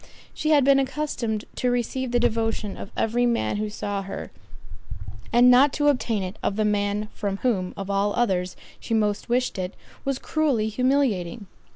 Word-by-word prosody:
She 310 - -2
had 295 -3 +5
been 275 0 +6
accustomed 260 -6 -2
to 250 - +1
receive 245 +1 -1
the 240 0 +2
devotion 225 -3 0
of - - -8
every 240 +2 +2
man 230 -3 0
who 215 0 -2
saw 205 -1 -3
her, 195 0 -7 1.0
and 245 +1 +6
not 265 +3 +6
to 290 0 +3
obtain 230 -7 0
it 185 +3 -6
of 195 - -1
the 215 0 +1
man 205 0 0
from 200 -2 -3
whom, 190 -7 +1
of 195 - -5
all 200 +1 +1
others, 185 -6 0 0.2
she 230 - -2
most 210 -1 0
wished 250 -4 0
it, 185 +1 -4 0.3
was 275 -1 -1
cruelly 275 -8 0
humiliating. 235 -6 0
225 Hz, 175 wpm, -24 LUFS, 205-250 Hz, 1.0 s, been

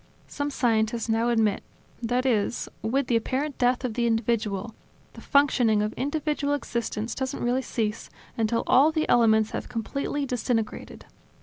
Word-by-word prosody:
Some 285 0 -3
scientists 230 -3 0
now 225 +2 +2
admit, 220 -4 +2 0.4
that 245 +2 0
is, 235 -2 0
that - - -3
with 270 +4 +1
the 240 - +1
apparent 270 +5 -1
death 250 +1 +2
of 240 - -2
the 235 +1 0
individual, 225 -2 -1 0.4
the - - -11
functioning 245 -7 +3
of 215 - -2
individual 290 0 -1
existence 235 -4 -3
doesn't 265 -1 -3
really 245 +2 +1
cease 225 -3 -3 0.3
until 230 0 0
all 270 +4 +5
of 315 - -1
the 310 - +1
elements 220 -2 +4
have - - -5
completely 275 +5 -3
disintegrated. 240 -3 -3
240 Hz, 155 wpm, -26 LUFS, 225-265 Hz, 0.4 s, all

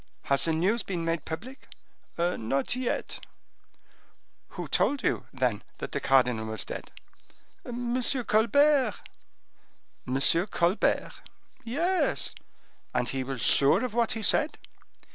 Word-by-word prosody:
"Has 140 0 +3
the 165 - +2
news 195 +9 +1
been 175 -4 -4
made 165 -3 -1
public?" 225 +12 -7 0.5
"Not 140 - 0
yet." 255 -1 -3 1.3
"Who - - -4
told 280 -2 +1
you, - - 0
then, 125 -5 -1
that - - -6
the - - -2
cardinal 125 -4 +2
was 110 -2 -4
dead?" - - -7 0.7
"M. 245 +1 -2
Colbert." 255 +1 +3 1.1
"M. 130 +2 0 0.3
Colbert?" 175 0 +1 0.5
"Yes." 335 +10 0 0.6
"And 120 - 0
he 135 0 -2
was 130 -2 -5
sure 140 - +4
of 250 - -5
what 235 -1 +1
he 225 -1 -5
said?" 305 +8 +3
195 Hz, 120 wpm, -28 LUFS, -, 1.3 s, sure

